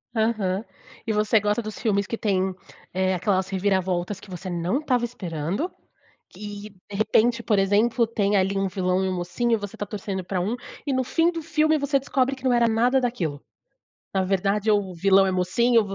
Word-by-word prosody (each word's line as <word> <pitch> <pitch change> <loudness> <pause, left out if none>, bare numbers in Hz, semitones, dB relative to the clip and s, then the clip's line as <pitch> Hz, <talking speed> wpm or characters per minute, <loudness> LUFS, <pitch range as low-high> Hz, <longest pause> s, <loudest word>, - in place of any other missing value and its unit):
Aham. 220 -3 0 0.4
E 220 - +1
você 215 +1 +3
gosta 210 +3 0
dos 215 -1 -7
filmes 200 -3 +1
que 230 - -4
têm, 190 -3 0 0.4
eh, 185 0 +1
aquelas 185 +1 0
reviravoltas 190 -1 0
que - - -15
você 185 +1 -7
não 175 +8 -1
estava 255 -5 0
esperando 190 - -3 0.6
que, 205 0 -8 0.2
de 200 - -5
repente, 230 +3 +2
por 210 - +2
exemplo, 215 +5 +3
tem 205 -2 +1
ali 195 +1 +1
um 195 - +1
vilão 185 -1 0
e - - 0
um 185 - -1
mocinho 185 +7 -1
e - - +5
você 205 -2 -7
está 205 - -4
torcendo 195 -2 -4
pra 185 0 -2
um, 210 +7 -1 0.3
e 280 - -1
no 260 0 +1
fim 330 +6 +2
do 335 -1 -5
filme 310 0 +2
você 285 -1 +1
descobre 270 0 0
que 260 - -16
não 255 - +3
era 240 -1 +4
nada 240 +4 +3
daquilo. 180 - -2 0.7
Na 190 -1 +1
verdade 195 +3 0
o 205 -3 +1
vilão 195 +2 +4
é - - +1
mocinho, 225 +6 +3
o 205 - -6
205 Hz, 200 wpm, -24 LUFS, 190-235 Hz, 0.7 s, e